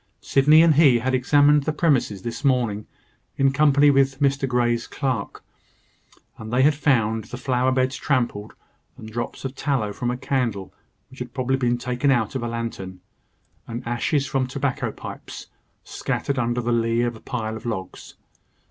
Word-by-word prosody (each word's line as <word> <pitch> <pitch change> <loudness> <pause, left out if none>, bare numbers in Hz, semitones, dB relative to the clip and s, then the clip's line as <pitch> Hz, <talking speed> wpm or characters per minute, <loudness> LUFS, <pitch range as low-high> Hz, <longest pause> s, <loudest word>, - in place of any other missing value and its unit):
Sydney 150 +4 +5
and 165 -2 +5
he 145 -5 +5
had 130 +3 -1
examined 145 +2 +4
the 155 - +1
premises 135 - 0
this 120 +4 -5
morning, 120 -6 0 0.5
in 135 -1 +3
company 145 0 +4
with 135 -1 +2
Mr 140 -1 +1
Grey's 120 -1 0
clerk; 130 -7 -3 1.0
and 110 0 -8
they 125 +2 +3
had 150 +2 +5
found 115 -7 +1
the 125 - -8
flower 130 0 0
beds 130 +1 0
trampled, 120 -7 -1 0.4
and 110 - -10
drops 120 +3 -5
of 130 - -3
tallow 130 -8 -1
from 120 +2 -3
a 125 - -2
candle 125 -8 -2 0.4
which 130 - -14
had 125 0 -7
probably 130 0 0
been 120 -2 +1
taken 125 +3 -1
out 120 -5 +1
of 130 - -3
a 120 - -3
lantern, 115 -6 -5 0.7
and 115 0 -6
ashes 135 +4 0
from 130 -1 -1
tobacco 135 0 -2
pipes, - - -9 0.3
scattered 140 -2 -3
under 120 0 0
the 120 0 -1
lee 115 0 +1
of 120 -1 -2
a - - -12
pile 110 -3 -4
of 110 - -8
logs. 95 -5 -6
125 Hz, 170 wpm, -23 LUFS, 115-135 Hz, 1.0 s, Sydney